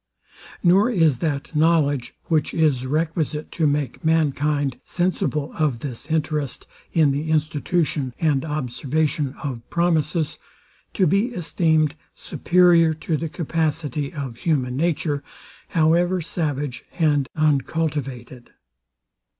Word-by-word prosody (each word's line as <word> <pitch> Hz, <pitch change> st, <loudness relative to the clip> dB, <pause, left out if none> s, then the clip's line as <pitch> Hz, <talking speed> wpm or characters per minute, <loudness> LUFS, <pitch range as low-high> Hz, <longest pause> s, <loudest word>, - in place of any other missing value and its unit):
Nor 190 Hz, +6 st, +5 dB
is 165 Hz, -, +3 dB
that 150 Hz, -1 st, -3 dB
knowledge, 150 Hz, -5 st, +2 dB
which 155 Hz, -3 st, 0 dB
is 145 Hz, -6 st, +2 dB
requisite 155 Hz, +1 st, -1 dB
to 160 Hz, -3 st, +1 dB
make 145 Hz, +2 st, -1 dB
mankind 145 Hz, -4 st, +1 dB
sensible 165 Hz, -4 st, -1 dB
of 140 Hz, -7 st, +1 dB
this 140 Hz, +1 st, -6 dB
interest 150 Hz, -3 st, -1 dB, 0.3 s
in 155 Hz, -4 st, +4 dB
the 145 Hz, +3 st, -2 dB
institution 155 Hz, -2 st, 0 dB
and 145 Hz, -5 st, +2 dB
observance 150 Hz, +1 st, -1 dB, 0.2 s
of 130 Hz, -5 st, -4 dB
promises, 165 Hz, -2 st, 0 dB, 0.5 s
to 190 Hz, -, +2 dB
be 200 Hz, +5 st, +2 dB
esteemed 160 Hz, -3 st, +1 dB, 0.2 s
superior 170 Hz, -3 st, +3 dB
to 160 Hz, +1 st, -2 dB
the 160 Hz, +2 st, -3 dB
capacity 155 Hz, -3 st, -2 dB
of 135 Hz, -6 st, -6 dB
human 130 Hz, -4 st, 0 dB
nature, 150 Hz, -1 st, 0 dB, 0.5 s
however 170 Hz, +3 st, +2 dB
savage 145 Hz, -5 st, -3 dB
and 145 Hz, -5 st, +2 dB
uncultivated. 140 Hz, -5 st, -1 dB
155 Hz, 110 wpm, -22 LUFS, 140-165 Hz, 0.5 s, Nor